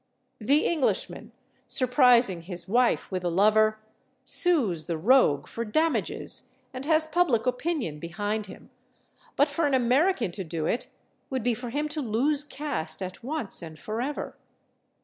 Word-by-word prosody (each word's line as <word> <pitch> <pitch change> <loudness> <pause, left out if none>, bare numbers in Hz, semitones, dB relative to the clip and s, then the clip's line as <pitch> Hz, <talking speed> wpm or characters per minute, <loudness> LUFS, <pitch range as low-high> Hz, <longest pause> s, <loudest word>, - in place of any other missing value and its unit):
The 280 +8 +2
Englishman, 320 -6 -1 0.4
surprising 250 - +4
his 175 +2 -6
wife 240 +2 +1
with 185 -1 -3
a 175 - 0
lover, 215 +4 +3 0.5
sues 240 - +1
the 170 -2 -2
rogue 200 - +4
for 230 - -5
damages 310 +9 -1 0.2
and 260 +1 -6
has 315 0 +3
public 315 -8 +1
opinion 250 - -2
behind 205 +6 -3
him, - - -13 0.6
but 285 +1 +3
for 295 +1 +1
an 280 - +2
American 255 - +2
to 190 +2 -5
do 160 -2 -4
it 235 - -1 0.4
would 260 -4 -2
be 245 0 +2
for 245 +2 -6
him 295 +5 -2
to 300 0 -3
lose 275 +5 +1
caste 265 - -4
at 185 +3 -8
once 275 -7 -3
and 160 -2 -9
forever. 235 - -4
240 Hz, 150 wpm, -27 LUFS, 190-290 Hz, 0.6 s, surprising